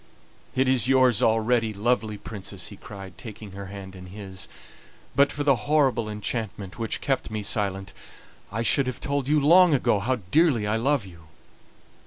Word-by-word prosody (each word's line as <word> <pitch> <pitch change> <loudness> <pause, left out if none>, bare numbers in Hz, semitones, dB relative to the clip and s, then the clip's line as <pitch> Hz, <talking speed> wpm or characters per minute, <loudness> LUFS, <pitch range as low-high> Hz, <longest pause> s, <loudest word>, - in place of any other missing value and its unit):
"It 130 +1 +2
is 130 -2 +3
yours 130 -3 +4
already, 115 -1 +2
lovely 110 0 0
Princess!" 100 -2 -6
he 105 - -10
cried, 95 -3 -11
taking 105 -2 -9
her 100 0 -8
hand 95 -1 -9
in 90 0 -10
his; 95 -1 -8 0.7
"but 140 0 +4
for 145 - -3
the 140 -2 +4
horrible 135 -7 +2
enchantment 105 -2 -4
which 115 -1 -2
kept 135 -1 -1
me 110 -1 -4
silent 95 -2 -1 0.6
I 110 +3 -2
should 130 +4 +3
have 130 - -4
told 140 -2 -2
you 150 +1 +3
long 170 +2 +6
ago 115 -5 +2
how 125 +6 0 0.2
dearly 150 -9 +4
I 105 +2 +1
love 135 -1 +1
you." 85 -4 -14
110 Hz, 170 wpm, -25 LUFS, 100-130 Hz, 0.7 s, long